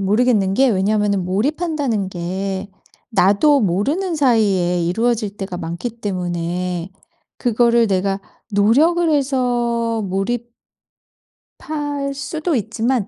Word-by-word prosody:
모르겠는 205 -1 +2
게 265 +5 +4
왜냐하면은 200 -2 +1
몰입한다는 260 - -1
게 190 +2 -4 0.4
나도 220 +8 +4
모르는 280 - 0
사이에 200 - +2
이루어질 210 +3 0
때가 190 -2 -5
많기 170 +7 -4
때문에 180 -4 -3 0.5
그거를 235 -1 +3
내가 195 0 0 0.3
노력을 290 +13 +3
해서 240 -5 0
몰입 210 +5 -2 1.1
할 290 -2 -3
수도 310 +4 -2
있지만 230 0 -1
220 Hz, 245 characters per minute, -19 LUFS, 190-260 Hz, 1.1 s, 게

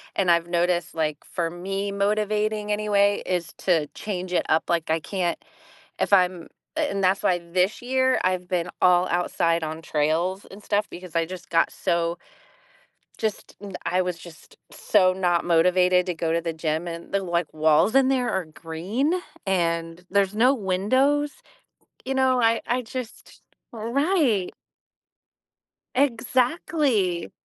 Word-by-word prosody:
and 185 -3 +3
I've 170 0 +2
noticed, 175 -1 0
like, 155 -2 -1
for 170 -2 -2
me, 195 +4 -4
motivating 210 +1 0
anyway 205 -1 +2
is 175 -3 -2
to 165 -5 +1
change 185 +1 -5
it - - +1
up, 155 - +3
like, 170 -2 0
I 160 +1 +2
can't 175 +1 -2 0.6
if - - 0
I'm 180 -2 +3 0.3
a - - +2
and 200 -1 -2
that's 190 +1 +2
why 180 -1 +2
this 180 +3 -1
year, 260 +1 +2
I've 185 -1 0
been 175 -1 -1
all 180 0 +5
outside 170 -1 +1
on 160 +1 -5
trails 165 +6 0
and 200 +2 -12
stuff 210 0 0
because 180 -1 -10
I 165 - +2
just 180 +1 -9
got 165 0 +3
so 170 0 -1 1.0
just 215 -2 -4
da 205 - -7 0.2
I 185 +1 +1
was 180 -2 -3
just 170 -2 -15
so 185 -3 +3
not 180 -2 +1
motivated 180 +2 +3
to 180 - -1
go 165 0 -2
to 170 - +1
the 165 -1 -3
gym, 160 +1 -2
and 170 0 -7
the, 195 0 +1
like, 170 -3 -1
walls 155 - +3
in 270 -1 +5
there 255 -2 +1
are 190 -2 -1
green, 175 - -2 0.3
and 170 -2 -1
there's 200 0 +1
no 250 +5 +5
windows. 260 +8 +1 0.7
You 265 +1 -2
know, 260 -1 +3
I 230 0 +3
I 250 +1 0
just 250 0 -8 0.3
Right. 240 - +1 1.4
Exactly. 250 - +1
185 Hz, 150 wpm, -24 LUFS, 170-215 Hz, 1.4 s, all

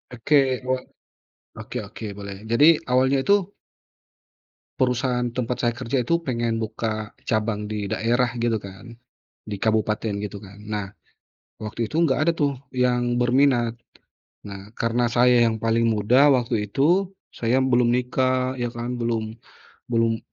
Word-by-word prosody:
Oke, 140 +6 +2 0.3
wa 130 - +2 0.9
oke - - -8
oke - - -10
boleh 100 -1 -7
jadi 115 +6 +5 0.2
awalnya 130 +2 +3
tuh 200 -1 +3 1.3
perusahaan 125 -1 +1
tempat 125 0 -2
saya 120 -1 +1
kerja 125 0 -2
itu 170 0 +1
pengen 120 -4 -1
buka 110 0 -4 0.2
cabang 110 -2 -1
di 105 -2 -4
daerah 120 +2 +1
gitu 115 -1 +1
kan. 100 +5 -11 0.5
Di 105 -2 -6
kabupaten 110 0 0
gitu 105 -1 -6
kan. 100 -1 -13
Nah, 105 -1 -4 0.8
waktu 110 +1 -3
itu 155 - -5
enggak 155 +1 +1
ada - - +5
tuh 140 -4 0 0.2
yang 120 -1 +1
berminat. 120 -1 +3 0.7
Nah, 100 -1 -9
karena 120 +1 0
saya 120 0 +4
yang 110 - 0
paling 115 +1 +1
muda 115 +6 +4
waktu 120 -6 +1
itu, 170 - +2 0.2
saya 125 +3 +1
belum 125 -2 +3
nikah 130 +1 0
ya 120 - 0
kan, 120 +1 -5
belum 115 -1 -2 0.5
belum 115 -1 +1
120 Hz, 140 wpm, -23 LUFS, 110-125 Hz, 1.3 s, jadi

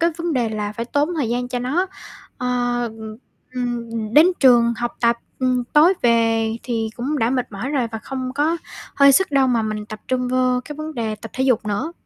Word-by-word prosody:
cái 335 +1 +3
vấn 340 0 -2
đề 245 -5 +1
là 210 -1 -3
phải 230 +2 -4
tốn 290 +7 0
thời 270 -8 0
gian 245 +1 -2
cho 250 0 -2
nó. 285 +10 0 0.5
Ờ, 245 -1 0
ừm, 220 -1 -8 0.7
ừm, 225 -1 -4
đến 305 +3 +8
trường 240 -3 +5
học 240 0 -3
tập, 235 0 +3 0.2
ừm, 255 -1 +1
tối 305 +9 +4
về 225 -1 +2
thì 225 -3 -2
cũng 280 +5 -2
đã 230 -1 +1
mệt 250 -3 -2
mỏi 230 +7 -4
rồi 270 -5 0
và 225 - -3
không 255 +2 -5
có 310 +4 +1 0.4
hơi 280 0 +6
sức 380 +5 +3
đâu 275 -2 +3
mà 240 -3 +1
mình 215 -1 -4
tập 215 0 -8
trung 250 -1 0
vô 255 0 +1
cái 295 - -8
vấn 310 +1 -6
đề 225 -3 -2
tập 225 +1 -10
thể 260 - 0
dục 245 -5 +1
nữa. 210 +11 -2
245 Hz, 220 wpm, -21 LUFS, 225-275 Hz, 0.7 s, đến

